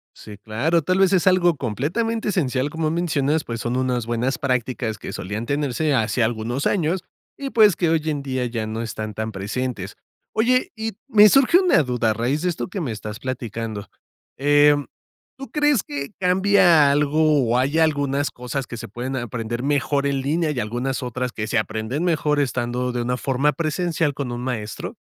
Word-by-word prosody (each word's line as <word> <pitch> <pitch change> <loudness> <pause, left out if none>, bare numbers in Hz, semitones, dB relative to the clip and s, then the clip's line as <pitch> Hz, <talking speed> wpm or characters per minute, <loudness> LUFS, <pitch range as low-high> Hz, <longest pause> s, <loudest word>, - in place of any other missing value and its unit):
Sí, 105 -2 -11
claro, 135 +11 0
tal 185 +5 +1
vez 195 -2 +4
es 185 -3 +2
algo 180 -3 +4
completamente 175 - -2
esencial, 140 -8 0
como 155 0 -1
mencionas, 155 -3 0
pues 115 -1 -5
son 120 +1 -2
unas 125 -2 0
buenas 120 +3 -1
prácticas 125 -4 -2
que - - -7
solían 105 +5 -5
tenerse 145 +1 0
hace 115 0 +1
algunos 115 +4 -1
años 180 0 0 0.3
y, 275 -1 -5
pues, 215 -7 +5
que 170 - +1
hoy 165 -1 +3
en 150 -3 -1
día 130 -2 -2
ya 115 -2 -3
no 110 +1 -4
están 110 -2 -5
tan 110 0 -3
presentes. 105 +1 -4 0.4
Oye, 250 +3 +2
y 220 0 -3 0.2
me 210 -5 +7
surge 275 +7 +5
una 360 - +4
duda 125 -4 0
a - - +1
raíz 125 +9 -1
de 180 - +2
esto 170 - -3
que 195 - -5
me 145 -9 -2
estás 105 0 -6
platicando. 115 -5 -5 0.5
Eh, 145 +1 +5 0.6
¿tú 270 -1 -9
crees 295 -6 +2
que 140 -1 -5
cambia 180 -5 +5
algo 150 0 +3
o 120 - +3
hay 140 +5 +1
algunas 145 -3 +1
cosas 125 +2 -5
que 120 - -7
se - - -7
pueden 125 +6 -5
aprender 120 0 -4
mejor 140 0 +1
en 140 -1 0
línea 155 +3 0
y 130 - -3
algunas 120 +4 -2
otras 125 0 -3
que 110 -1 -4
se 115 - 0
aprenden 110 +7 -2
mejor 150 -4 +1
estando 125 -2 -1
de 120 0 -2
una 125 +1 -1
forma 135 +3 +1
presencial 165 -1 -1
con 135 -3 -4
un 120 0 -4
maestro? 115 -5 -4
135 Hz, 185 wpm, -22 LUFS, 120-160 Hz, 0.6 s, me